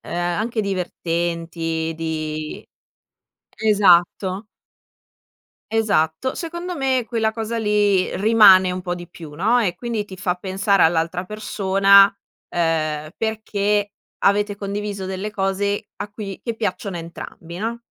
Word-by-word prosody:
ehm, - - -9
anche 205 +7 -1
divertenti 165 -3 -2
di 155 -1 -4 0.9
esatto 195 -1 +3 1.3
esatto. 205 0 +1
Secondo 345 +2 -5
me 265 -4 0
quella 225 -2 0
cosa 225 +1 -3
lì, 205 -3 +2
rimane 200 -3 +6
un 180 0 -4
po' 175 -1 -3
di 175 0 -9
più, 160 -4 -11
no, 220 +8 +3
e 190 -7 0
quindi 230 0 -3
ti 190 -2 -11
fa 185 -2 0
pensare 195 +2 0
all'altra 165 +2 +2
persona, 200 -1 +4 0.4
ehm, 155 -2 -1
perché 210 -2 -1 0.3
avete 205 +1 +2
condiviso 200 -1 -4
delle 190 +2 -4
cose 200 +1 -1
a 205 - -5
cui 205 -2 -7
che 230 -2 -3
piacciono 200 -4 -3
a - - -4
entrambi, 170 0 -9
no, 230 +2 -3
195 Hz, 125 wpm, -21 LUFS, 175-215 Hz, 1.3 s, rimane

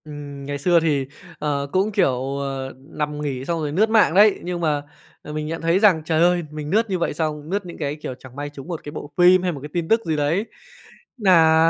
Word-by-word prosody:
Ừm. 145 -2 -8
Ngày 145 0 -3
xưa 170 +4 +4
thì, 150 -4 +1 0.3
ờ, 145 -2 -1
cũng, 195 +3 +1
kiểu, 135 -8 0
ờ, 135 -1 -4
nằm 150 +2 -5
nghỉ 135 -3 -3
xong 170 +1 -1
rồi 150 -2 -2
lướt 210 +8 +2
mạng 220 -7 +4
đấy. 205 +2 +5
Nhưng 175 0 -3
mà, 150 -3 +1 0.4
ờ, 150 - -8
mình 150 0 -3
nhận 165 +1 -4
thấy 165 +3 +2
rằng, 195 -7 +5
trời 160 0 +1
ơi, 175 0 +3
mình 150 -1 -6
lướt 220 +5 +2
như 185 -2 -1
vậy 170 - 0
xong, 150 -1 -3
lướt 200 +1 -2
những 175 - -9
cái, 145 -2 -2
kiểu, 150 -4 -6
chẳng 130 -1 -13
may 145 +1 -4
trúng 145 0 -11
một 170 -3 -5
cái 145 - -7
bộ 150 -1 -8
phim 180 +1 +6
hay 180 - +1
một 145 - -6
cái 150 - -7
tin 170 -2 -1
tức 225 +1 +3
gì 160 -2 0
đấy 150 +8 0 0.7
nà 165 -6 +5
155 Hz, 245 wpm, -22 LUFS, 145-180 Hz, 0.7 s, phim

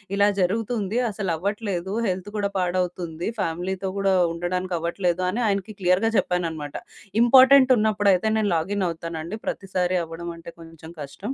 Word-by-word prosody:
ఇలా 200 0 +4
జరుగుతుంది 215 +2 -1
అసలవ్వట్లేదు 195 0 -3
హెల్త్ 185 +2 -3
కూడా 200 -1 0
పాడవుతుంది. 180 -1 -2
ఫ్యామిలీతో 185 +3 -2
గూడా 195 -1 +2 0.2
ఉండడానికవ్వట్లేదు 175 0 -1
అని 220 +7 -2
ఆయనకి 200 +1 -1
క్లియర్‌గా 185 +5 +2
చెప్పాననమాట. 165 -5 -2 0.5
ఇంపార్టెంట్ 260 +1 +7
ఉన్నప్పుడైతే 205 -2 +2
నేను 210 -3 +1
లాగిన్ 190 +4 -1
అవుతానండి. 165 +3 -5
ప్రతిసారి 185 -1 -1
అవ్వడం 165 +1 -7
అంటే 165 0 -10
కొంచెం 165 0 -12
కష్టం. 190 - -6
185 Hz, 120 wpm, -24 LUFS, 170-205 Hz, 0.5 s, ఇంపార్టెంట్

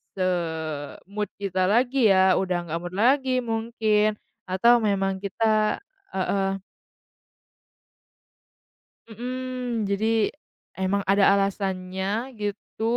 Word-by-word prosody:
se-mood 170 +2 -3
kita 185 -2 0
lagi 245 +4 +3
ya, 190 -1 +5
udah 185 -2 0
nggak 165 +2 -2
mood 175 +1 -7
lagi 260 +4 +3
mungkin 220 -2 +1 0.3
atau 235 +6 +5
memang 195 -3 0
kita 215 +2 +1 0.3
heeh. 195 0 0 2.5
Mhm, 250 0 -4
jadi 200 +2 0 0.8
emang 200 +1 0
ada 195 +1 +3
alasannya 190 -1 -2 0.4
gitu, 205 +1 -5
200 Hz, 90 wpm, -25 LUFS, 190-225 Hz, 2.5 s, ya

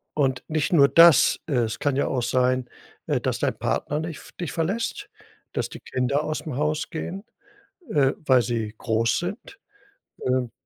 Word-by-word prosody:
und 130 -4 0
nicht 155 +2 -1
nur 140 -4 +7
das, 165 -3 +7
es 120 -7 0
kann 145 -2 0
ja 140 - +1
auch 125 -3 -1
sein, 125 0 +1 0.4
äh, - - 0
dass - - -1
dein - - -1
Partner 150 +1 -1
nicht 160 -1 -5
v - - -14
dich 175 - -3
verlässt, 230 - -2 0.4
dass - - -2
die - - -9
Kinder 135 +4 -1
aus 155 0 -2
dem 150 -6 -6
Haus 150 +1 -1
gehen, 185 +4 -5 0.7
äh, 140 -3 +3
weil 130 -3 +5
sie 115 -3 -3
groß 115 0 +1
sind. 205 - -6 0.7
Ähm, 125 -2 0
140 Hz, 170 wpm, -24 LUFS, 125-160 Hz, 0.7 s, nur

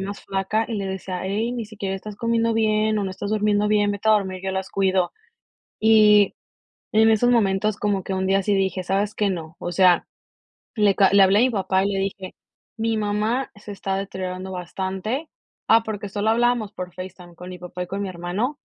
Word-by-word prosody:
más 200 +1 -5
flaca 195 +3 -1
y 230 - -4
le 200 -2 -3
decía: 190 -1 -5
"Ey, 215 +5 -1
ni 235 -3 -4
siquiera 200 -3 -4
estás 205 +2 -8
comiendo 230 0 +1
bien 215 -1 +2
o 205 - -1
no 190 - -3
estás 200 +2 -5
durmiendo 210 -1 +2
bien, 205 -1 +2
vete 205 +2 -2
a - - +7
dormir, 190 -3 0
yo 190 - -2
las 190 0 -3
cuido". 190 -2 +1 0.7
Y 210 -2 +5 0.6
en 220 +1 +5
esos 225 +2 +3
momentos 210 -3 +2
como 205 -3 -1
que 195 - -4
un 190 0 -1
día 195 +1 +3
sí 205 - +1
dije: 190 -1 0
"¿Sabes 200 +3 0
qué? 205 -1 +1
No, 165 -3 -5
o 175 - -4
sea", 180 -1 +4 0.7
le 205 -2 +4
ca 195 0 +5
le 200 - +7
hablé 195 +1 +5
a 230 - +5
mi 255 - +3
papá 190 -3 +1
y - - +1
le 195 -1 -1
dije: 195 -1 -4 0.4
"Mi 225 0 0
mamá 215 +5 -1
se 205 0 -9
está 195 -1 -3
deteriorando 190 -1 -5
bastante", 190 - -4 0.4
ah, 225 0 +6
porque 210 -2 -5
solo 205 +2 -1
hablábamos 240 -2 +1
por 180 -1 -7
FaceTime 180 -1 -9
con 180 +2 -10
mi 180 -1 -8
papá 180 +1 -6
y - - -12
con 200 +2 -3
mi 195 - -3
hermano. 185 - -3
200 Hz, 210 wpm, -23 LUFS, 190-215 Hz, 0.7 s, a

